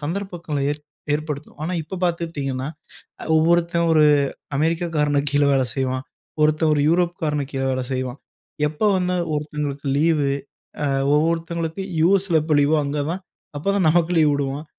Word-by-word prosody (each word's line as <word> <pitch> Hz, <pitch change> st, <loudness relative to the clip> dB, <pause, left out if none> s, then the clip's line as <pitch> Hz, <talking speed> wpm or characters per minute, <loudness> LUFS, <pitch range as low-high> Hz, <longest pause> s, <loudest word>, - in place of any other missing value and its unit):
சந்தர்ப்பங்களை 165 Hz, -3 st, -3 dB
ஏ -, -, -3 dB, 0.4 s
ஏற்படுத்தும். 150 Hz, -1 st, -5 dB
ஆனா 180 Hz, -, -2 dB
இப்போ 155 Hz, -, -8 dB
பாத்துக்கிட்டீங்கனா, 145 Hz, -6 st, -2 dB, 0.7 s
ஒவ்வொருத்தன் 170 Hz, +1 st, +2 dB
ஒரு 155 Hz, -1 st, +5 dB, 0.5 s
அமெரிக்காகாரனுக்கு 150 Hz, -3 st, +1 dB
கீழே 145 Hz, 0 st, +4 dB
வேலை 130 Hz, -1 st, +2 dB
செய்வான், 130 Hz, 0 st, -1 dB, 0.4 s
ஒருத்தன் 155 Hz, +1 st, +3 dB
ஒரு 145 Hz, -, +2 dB
யூரோப்காரனுக்கு 165 Hz, -5 st, 0 dB
கீழே 135 Hz, 0 st, -1 dB
வேலை 130 Hz, -1 st, -1 dB
செய்வான். 130 Hz, +1 st, -3 dB, 0.5 s
எப்போ 155 Hz, +8 st, -2 dB
வந்து 180 Hz, 0 st, 0 dB, 0.2 s
ஒருத்தவங்களுக்கு 150 Hz, -1 st, -3 dB
லீவ், 155 Hz, -1 st, +3 dB, 0.6 s
அ -, -, +1 dB, 0.3 s
ஒவ்வொருத்தவங்களுக்கு 165 Hz, +2 st, -1 dB, 0.2 s
USல 190 Hz, -3 st, +3 dB
எப்போ 155 Hz, -1 st, +1 dB
லீவோ 150 Hz, +2 st, +3 dB
அங்க 145 Hz, +1 st, -2 dB
தான், 185 Hz, +2 st, -4 dB, 0.4 s
அப்போ 150 Hz, +7 st, -6 dB
தான் 185 Hz, -5 st, +3 dB
நமக்கு 170 Hz, +1 st, +2 dB
லீவ் 150 Hz, -2 st, +4 dB
உடுவான். 140 Hz, +2 st, -3 dB
155 Hz, 140 wpm, -22 LUFS, 145-170 Hz, 0.7 s, ஒரு